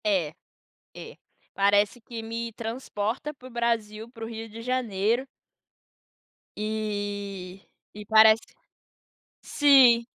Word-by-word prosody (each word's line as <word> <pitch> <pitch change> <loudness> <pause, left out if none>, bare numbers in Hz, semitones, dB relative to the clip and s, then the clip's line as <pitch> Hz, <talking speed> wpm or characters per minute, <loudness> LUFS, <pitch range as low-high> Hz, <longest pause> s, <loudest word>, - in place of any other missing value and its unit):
É, 185 -8 0 0.6
é, - - -10 0.4
parece 205 +3 +2
que 230 0 -8
me 230 +1 -5
transporta 230 +4 -4
para 255 -2 -13
o - - -16
Brasil, 230 -2 -2
para 230 -2 -8
o - - -6
Rio 225 0 -7
de 225 +1 -10
Janeiro. 235 -1 0 1.3
E, 205 -3 -4 0.3
e 210 0 -9
parece 220 +1 +6 1.0
sim, 260 -5 +5
220 Hz, 105 wpm, -26 LUFS, 205-235 Hz, 1.3 s, parece